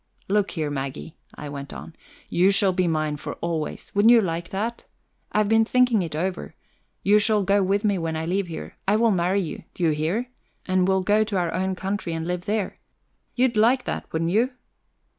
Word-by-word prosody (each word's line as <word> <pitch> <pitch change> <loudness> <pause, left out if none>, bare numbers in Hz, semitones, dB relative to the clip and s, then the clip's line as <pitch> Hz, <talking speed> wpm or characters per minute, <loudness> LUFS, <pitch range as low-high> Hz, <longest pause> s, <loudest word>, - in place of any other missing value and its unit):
"Look 205 0 +1
here, 155 -3 -3
Maggie," 140 +3 -5 0.2
I 150 - -7
went 140 0 -7
on, 165 - -9 0.3
"you 180 +3 +3
shall 200 -1 +3
be 180 -1 +1
mine 155 -2 0
for - - -6
always. 165 -3 -4
Wouldn't 205 +3 +5
you 240 - +8
like 170 -4 -2
that? 220 +5 -4 0.4
I've 210 -1 +2
been 225 +1 +4
thinking 245 -2 +3
it 165 -4 -4
over. 180 +4 -3 0.5
You 205 +2 +5
shall 210 -1 +2
go 200 +1 +3
with 195 +2 +1
me 200 -3 +1
when 165 -1 -2
I 160 0 -2
leave 185 +2 -1
here; 165 - -8
I 200 - +4
will 230 +1 +3
marry 185 +1 +1
you, 170 - -6
do 180 - -4
you 165 - +4
hear? 175 +12 -1 0.3
and 185 -1 +2
we'll 190 -1 +2
go 210 +3 +3
to 205 -2 -2
our 175 -2 0
own 190 +1 -1
country 190 -2 -3
and 165 0 -3
live 180 +1 -3
there. 210 -2 -2 0.6
You'd 250 -1 +2
like 240 +5 +4
that, - - -5
wouldn't 165 +1 -1
you?" 235 +6 +2
190 Hz, 205 wpm, -24 LUFS, 165-210 Hz, 0.6 s, you